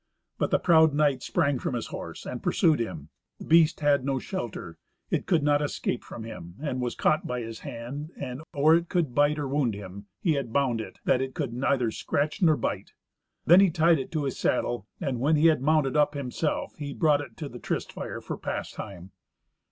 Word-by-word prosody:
But -, -, +1 dB
the -, -, +3 dB
proud 160 Hz, -4 st, +5 dB
knight 145 Hz, -4 st, +2 dB
sprang 140 Hz, -5 st, +1 dB
from 125 Hz, -, -2 dB
his 115 Hz, -, -3 dB
horse, -, -, -7 dB
and -, -, -5 dB
pursued 160 Hz, -3 st, +3 dB
him. 80 Hz, -10 st, -4 dB, 0.3 s
The -, -, -10 dB
beast 165 Hz, -1 st, +4 dB
had 145 Hz, -3 st, +3 dB
no 135 Hz, 0 st, 0 dB
shelter. 120 Hz, -, -5 dB, 0.3 s
It -, -, -1 dB
could 170 Hz, -5 st, +2 dB
not 145 Hz, 0 st, +3 dB
escape 140 Hz, -4 st, -2 dB
from 115 Hz, -, -8 dB
him, 85 Hz, -6 st, -9 dB
and 135 Hz, -4 st, -3 dB
was 120 Hz, -1 st, -2 dB
caught 155 Hz, -, +1 dB
by 125 Hz, 0 st, -2 dB
his 115 Hz, -1 st, -7 dB
hand, 135 Hz, +6 st, -6 dB
and, 130 Hz, -1 st, -5 dB
or 150 Hz, +2 st, +4 dB
it 170 Hz, +1 st, +2 dB
could 160 Hz, -9 st, 0 dB
wound 145 Hz, -4 st, +1 dB
him, 100 Hz, 0 st, -9 dB
he 165 Hz, -, +2 dB
had 140 Hz, -5 st, -3 dB
bound 125 Hz, -4 st, +1 dB
it, -, -, -9 dB
that 130 Hz, -, +3 dB
it 130 Hz, 0 st, -4 dB
could 115 Hz, -, -3 dB
neither 125 Hz, -2 st, +1 dB
scratch 150 Hz, -, -2 dB
nor 160 Hz, -4 st, +5 dB
bite. -, -, -3 dB, 0.5 s
Then 175 Hz, +3 st, +8 dB
he 195 Hz, -1 st, +6 dB
tied 165 Hz, -1 st, +3 dB
it 135 Hz, -, -6 dB
to 155 Hz, -2 st, 0 dB
his 135 Hz, -2 st, -3 dB
saddle, 120 Hz, -4 st, 0 dB
and, 135 Hz, -8 st, -2 dB
when 150 Hz, +5 st, +3 dB
he 150 Hz, +2 st, +3 dB
had 155 Hz, -5 st, +2 dB
mounted 150 Hz, -1 st, +2 dB
up 150 Hz, 0 st, +3 dB
himself, 140 Hz, +3 st, -2 dB
he 145 Hz, -2 st, -5 dB
brought 150 Hz, -3 st, +3 dB
it 120 Hz, -6 st, -10 dB
to 150 Hz, -, -5 dB
the 120 Hz, -3 st, -9 dB
tryst -, -, -3 dB
fire -, -, -6 dB
for -, -, -5 dB
pastime. 95 Hz, -3 st, -6 dB
140 Hz, 205 wpm, -27 LUFS, 120-155 Hz, 0.5 s, Then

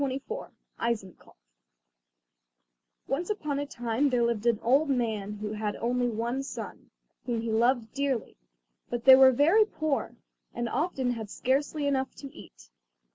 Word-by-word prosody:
] -, -, -19 dB
Eisenkopf 220 Hz, -6 st, -4 dB, 1.7 s
Once 310 Hz, +8 st, -2 dB
upon 305 Hz, -9 st, -2 dB
a 285 Hz, -, -3 dB
time 240 Hz, +2 st, 0 dB
there 245 Hz, -2 st, +2 dB
lived 235 Hz, -1 st, 0 dB
an 235 Hz, -2 st, +3 dB
old 275 Hz, +6 st, +3 dB
man 220 Hz, -6 st, -1 dB
who 210 Hz, 0 st, -5 dB
had 210 Hz, -1 st, -3 dB
only 245 Hz, +1 st, 0 dB
one 235 Hz, +3 st, -2 dB
son, 275 Hz, -, -8 dB, 0.4 s
whom 235 Hz, -2 st, -1 dB
he 230 Hz, 0 st, -3 dB
loved 235 Hz, 0 st, +1 dB
dearly; 270 Hz, -5 st, -2 dB, 0.5 s
but 240 Hz, 0 st, -4 dB
they 265 Hz, -1 st, +11 dB
were 265 Hz, 0 st, +8 dB
very 320 Hz, -, +5 dB
poor, 315 Hz, -8 st, -2 dB, 0.4 s
and 240 Hz, 0 st, -2 dB
often 265 Hz, -1 st, -1 dB
had 220 Hz, -3 st, -5 dB
scarcely 285 Hz, +6 st, -1 dB
enough 265 Hz, -2 st, -1 dB
to 275 Hz, -1 st, -10 dB
eat. -, -, -15 dB
245 Hz, 145 wpm, -28 LUFS, 230-275 Hz, 1.7 s, they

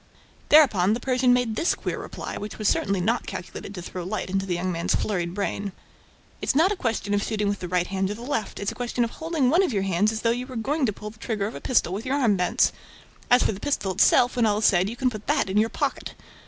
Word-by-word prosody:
Thereupon, 215 Hz, -11 st, +5 dB
the -, -, -4 dB
Persian 255 Hz, 0 st, +2 dB
made 245 Hz, -3 st, +2 dB
this 335 Hz, -, +1 dB
queer -, -, -4 dB
reply, -, -, -7 dB
which 210 Hz, 0 st, -6 dB
was 215 Hz, -, -1 dB
certainly 200 Hz, -1 st, +1 dB
not 225 Hz, +7 st, 0 dB
calculated 195 Hz, +2 st, -7 dB
to 180 Hz, -, -6 dB
throw 180 Hz, 0 st, -6 dB
light 190 Hz, 0 st, -4 dB
into 195 Hz, 0 st, -1 dB
the 180 Hz, -, 0 dB
young 180 Hz, +2 st, -2 dB
man's 170 Hz, -1 st, 0 dB
flurried 175 Hz, -4 st, -2 dB
brain: 200 Hz, -1 st, -3 dB, 0.7 s
"It's -, -, 0 dB
not 330 Hz, +7 st, +4 dB
a -, -, 0 dB
question 225 Hz, -, -2 dB
of 205 Hz, -, +2 dB
shooting 210 Hz, -1 st, -1 dB
with 200 Hz, 0 st, -1 dB
the 180 Hz, -, -5 dB
right 180 Hz, 0 st, +1 dB
hand 190 Hz, 0 st, -1 dB
or 205 Hz, -, -3 dB
the 230 Hz, -, -10 dB
left; 245 Hz, -5 st, -3 dB
it's 200 Hz, -, -2 dB
a -, -, -8 dB
question 245 Hz, 0 st, -1 dB
of 230 Hz, -, -2 dB
holding 315 Hz, -6 st, 0 dB
one 345 Hz, +5 st, +5 dB
of 370 Hz, -, +1 dB
your 195 Hz, -2 st, 0 dB
hands 195 Hz, +3 st, +2 dB
as 220 Hz, -1 st, -4 dB
though 230 Hz, -, +3 dB
you 245 Hz, +2 st, -3 dB
were 260 Hz, -, -9 dB
going 270 Hz, +5 st, 0 dB
to -, -, +1 dB
pull 210 Hz, +1 st, -8 dB
the 220 Hz, -, -20 dB
trigger 215 Hz, -4 st, -2 dB
of 215 Hz, -, -4 dB
a -, -, -8 dB
pistol 235 Hz, -8 st, +1 dB
with 215 Hz, +6 st, -5 dB
your 270 Hz, -, +1 dB
arm 235 Hz, -7 st, +3 dB
bent. 180 Hz, -1 st, +2 dB, 0.6 s
As 245 Hz, +1 st, +5 dB
for -, -, +2 dB
the 195 Hz, -, -7 dB
pistol 275 Hz, -9 st, -1 dB
itself, 245 Hz, +6 st, +4 dB
when 235 Hz, -2 st, +3 dB
all 205 Hz, -1 st, +2 dB
is 215 Hz, -, 0 dB
said, 190 Hz, +1 st, +4 dB
you 230 Hz, -, -6 dB
can 255 Hz, 0 st, 0 dB
put 215 Hz, -2 st, -9 dB
that 285 Hz, -10 st, +1 dB
in 200 Hz, -, 0 dB
your 220 Hz, +2 st, +3 dB
pocket!" -, -, -3 dB
215 Hz, 275 wpm, -25 LUFS, 195-245 Hz, 0.7 s, Thereupon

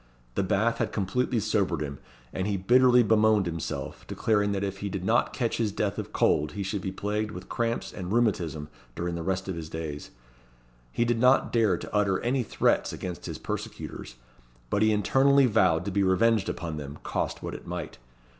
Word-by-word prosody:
The -, -, 0 dB
bath 110 Hz, +5 st, +1 dB
had -, -, 0 dB
completely 115 Hz, +5 st, 0 dB
sobered 95 Hz, -6 st, 0 dB
him, 70 Hz, -2 st, -4 dB, 0.3 s
and 95 Hz, +1 st, -2 dB
he 100 Hz, -1 st, 0 dB
bitterly 125 Hz, +5 st, +5 dB
bemoaned 110 Hz, -2 st, +4 dB
himself, 85 Hz, -2 st, -4 dB
declaring 105 Hz, -2 st, +1 dB
that 100 Hz, 0 st, -1 dB
if 100 Hz, 0 st, -3 dB
he 100 Hz, -, -3 dB
did 95 Hz, -1 st, -4 dB
not 115 Hz, +3 st, +2 dB
catch 120 Hz, -3 st, -1 dB
his 110 Hz, -3 st, 0 dB
death 100 Hz, -1 st, -2 dB
of -, -, -6 dB
cold 75 Hz, 0 st, +2 dB
he 100 Hz, 0 st, -3 dB
should 100 Hz, +1 st, -3 dB
be 95 Hz, -, -3 dB
plagued 105 Hz, +2 st, -2 dB
with 105 Hz, -, -9 dB
cramps 115 Hz, 0 st, -2 dB
and 90 Hz, -1 st, -6 dB
rheumatism 95 Hz, -10 st, 0 dB, 0.3 s
during 85 Hz, 0 st, -2 dB
the 85 Hz, -, -3 dB
rest 95 Hz, +2 st, -2 dB
of 95 Hz, -, -3 dB
his 80 Hz, -2 st, -6 dB
days. 80 Hz, -3 st, -5 dB, 0.8 s
He 120 Hz, -, +1 dB
did 120 Hz, -1 st, +1 dB
not 125 Hz, +2 st, +4 dB
dare 110 Hz, -6 st, +3 dB
to -, -, -9 dB
utter 100 Hz, -2 st, +2 dB
any 125 Hz, +2 st, +1 dB
threats 115 Hz, -, +1 dB
against 90 Hz, -2 st, -6 dB
his -, -, -5 dB
persecutors, -, -, -6 dB, 0.6 s
but 105 Hz, -, +1 dB
he 110 Hz, 0 st, +4 dB
internally 135 Hz, +6 st, +4 dB
vowed 90 Hz, -7 st, +3 dB
to 100 Hz, -, -2 dB
be 100 Hz, +1 st, +1 dB
revenged 100 Hz, +2 st, +3 dB
upon 80 Hz, -3 st, -4 dB
them 70 Hz, 0 st, -7 dB
cost -, -, -3 dB
what -, -, -4 dB
it -, -, -9 dB
might. -, -, -5 dB
100 Hz, 195 wpm, -27 LUFS, 90-115 Hz, 0.8 s, bitterly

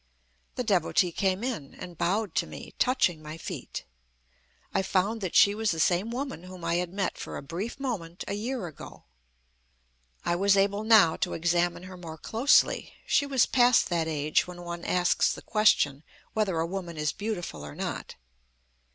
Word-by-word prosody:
The 250 Hz, -, -1 dB
Devotee 185 Hz, -4 st, +2 dB
came 190 Hz, +4 st, 0 dB
in, 225 Hz, -, -4 dB
and 175 Hz, -1 st, -9 dB
bowed 195 Hz, +3 st, 0 dB
to -, -, 0 dB
me, -, -, -10 dB
touching 220 Hz, -, +2 dB
my 155 Hz, +1 st, -8 dB
feet. -, -, -6 dB, 0.9 s
I -, -, +2 dB
found 195 Hz, +4 st, 0 dB
that 185 Hz, -3 st, -3 dB
she 200 Hz, 0 st, +7 dB
was 220 Hz, +1 st, 0 dB
the 165 Hz, -, -1 dB
same 180 Hz, +6 st, +2 dB
woman 255 Hz, -, -4 dB
whom 185 Hz, -2 st, -9 dB
I 170 Hz, +1 st, +1 dB
had 175 Hz, -1 st, -2 dB
met, 195 Hz, 0 st, -2 dB
for -, -, -6 dB
a -, -, -7 dB
brief 185 Hz, -, -5 dB
moment, 190 Hz, -11 st, -4 dB
a -, -, -2 dB
year 230 Hz, +2 st, -3 dB
ago. 160 Hz, -4 st, -10 dB, 1.2 s
I 170 Hz, -, +2 dB
was 200 Hz, +2 st, +3 dB
able 200 Hz, +2 st, +2 dB
now 215 Hz, -7 st, +6 dB
to -, -, -1 dB
examine 175 Hz, +1 st, +1 dB
her 185 Hz, 0 st, -9 dB
more 165 Hz, -3 st, -8 dB
closely. 235 Hz, -, +2 dB
She 285 Hz, -, +2 dB
was 265 Hz, -4 st, +3 dB
past 245 Hz, -1 st, +4 dB
that 170 Hz, -2 st, 0 dB
age 150 Hz, 0 st, +1 dB
when 175 Hz, -1 st, -9 dB
one 170 Hz, 0 st, -6 dB
asks 180 Hz, -1 st, +2 dB
the -, -, -7 dB
question 150 Hz, -10 st, +3 dB, 0.3 s
whether 205 Hz, -6 st, 0 dB
a 165 Hz, -, +1 dB
woman 175 Hz, -2 st, -5 dB
is 150 Hz, -1 st, 0 dB
beautiful 175 Hz, -, -5 dB
or 75 Hz, 0 st, -8 dB
not. -, -, -5 dB
185 Hz, 175 wpm, -28 LUFS, 170-215 Hz, 1.2 s, she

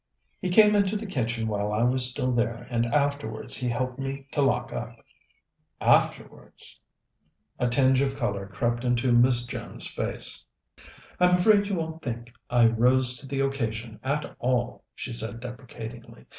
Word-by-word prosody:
"He 185 Hz, -, -2 dB
came 210 Hz, +3 st, +6 dB
into 205 Hz, 0 st, +2 dB
the 220 Hz, -, -6 dB
kitchen 115 Hz, -, -2 dB
while 105 Hz, -1 st, -1 dB
I 105 Hz, +2 st, +1 dB
was 125 Hz, +1 st, +2 dB
still 125 Hz, +1 st, -1 dB
there, 120 Hz, -1 st, -1 dB
and 120 Hz, 0 st, +1 dB
afterwards 140 Hz, -3 st, -1 dB
he 125 Hz, -1 st, -2 dB
helped 125 Hz, +2 st, -2 dB
me 135 Hz, 0 st, -4 dB
to 145 Hz, -, 0 dB
lock 135 Hz, -, +1 dB
up." -, -, -5 dB, 0.8 s
"Afterwards?" -, -, 0 dB, 0.8 s
A 125 Hz, -, +1 dB
tinge 130 Hz, +2 st, +3 dB
of 135 Hz, -1 st, 0 dB
colour 100 Hz, -7 st, -2 dB
crept 120 Hz, +4 st, -1 dB
into 125 Hz, 0 st, +1 dB
Miss 120 Hz, 0 st, +5 dB
Jones's -, -, -3 dB
face. -, -, -2 dB, 0.8 s
"I'm 180 Hz, 0 st, +5 dB
afraid 205 Hz, +2 st, +4 dB
you 200 Hz, -, -1 dB
won't 160 Hz, -1 st, -4 dB
think 120 Hz, -2 st, -6 dB, 0.2 s
I 120 Hz, -1 st, +5 dB
rose 125 Hz, +2 st, +3 dB
to 135 Hz, -, -11 dB
the 135 Hz, 0 st, -1 dB
occasion 115 Hz, -5 st, -2 dB
at 140 Hz, +4 st, -2 dB
all," 125 Hz, -1 st, -1 dB
she 125 Hz, -, -6 dB
said 115 Hz, 0 st, -3 dB
deprecatingly. 120 Hz, -1 st, -9 dB
125 Hz, 155 wpm, -26 LUFS, 115-140 Hz, 0.8 s, came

